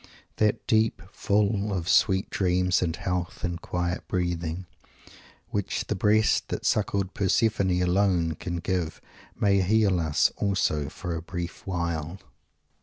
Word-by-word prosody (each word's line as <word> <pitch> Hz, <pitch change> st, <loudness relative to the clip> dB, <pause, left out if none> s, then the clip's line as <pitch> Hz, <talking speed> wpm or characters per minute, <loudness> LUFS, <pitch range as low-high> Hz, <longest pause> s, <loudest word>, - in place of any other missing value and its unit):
That 105 Hz, -1 st, +2 dB
sleep, 110 Hz, -4 st, +2 dB
"full 105 Hz, 0 st, +1 dB
of 90 Hz, -3 st, -2 dB
sweet 95 Hz, 0 st, +3 dB
dreams 90 Hz, 0 st, +2 dB
and 85 Hz, -2 st, 0 dB
health 90 Hz, -1 st, -3 dB
and 85 Hz, -1 st, -2 dB
quiet 90 Hz, 0 st, -3 dB
breathing," 85 Hz, -1 st, -2 dB, 0.9 s
which 100 Hz, -2 st, -2 dB
the -, -, -2 dB
breast 110 Hz, +1 st, +3 dB
that -, -, -4 dB
suckled 100 Hz, -2 st, 0 dB
Persephone 100 Hz, -2 st, +2 dB
alone 90 Hz, -3 st, +2 dB
can 85 Hz, +3 st, -5 dB
give 85 Hz, -2 st, -2 dB, 0.4 s
may 100 Hz, -1 st, +3 dB
heal 100 Hz, -1 st, +3 dB
us 80 Hz, -3 st, +2 dB
also 85 Hz, -7 st, 0 dB
for 85 Hz, +1 st, -5 dB
a 80 Hz, -, -4 dB
brief 85 Hz, +2 st, -6 dB
while. 85 Hz, -2 st, -2 dB
90 Hz, 130 wpm, -26 LUFS, 85-100 Hz, 0.9 s, sweet